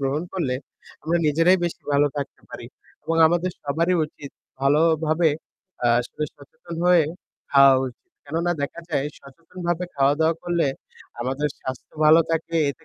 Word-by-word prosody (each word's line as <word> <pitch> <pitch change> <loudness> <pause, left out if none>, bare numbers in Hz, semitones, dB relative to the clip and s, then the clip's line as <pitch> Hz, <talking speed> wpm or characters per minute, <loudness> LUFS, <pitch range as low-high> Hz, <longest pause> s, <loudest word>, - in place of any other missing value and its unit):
গ্রহণ 140 +3 -1
করলে 150 -9 -1 0.5
আমরা 165 +2 +1
নিজেরাই 165 +5 +4
বেশি 170 - -4
ভালো 145 +1 +4
থাকতে 140 -1 -5
পারি - - -8 0.4
এবং 165 - -1
আমাদের 175 +2 +1
সবারই 165 +5 +1
উচিত 145 -2 -11 0.3
ভালোভাবে 160 +3 +3 0.7
আসলে 125 +5 -7
সচেতন 170 - -12
হয়ে 175 -3 +5 0.5
খাওয়া 140 -1 +7
উচিত। 125 - -10 0.2
কেননা 165 +4 -1
দেখা 140 +4 -4
যায় 145 -1 0
সচেতনভাবে 170 +4 -5
খাওয়া-দাওয়া 145 +4 +3
করলে, 175 -3 +1 0.5
আমাদের 135 +5 -1
স্বাস্থ্য 130 +2 -7
ভালো 155 +2 +7
থাকে। 165 +1 -2 0.2
এতে 160 +3 -13
160 Hz, 135 wpm, -23 LUFS, 140-170 Hz, 0.7 s, খাওয়া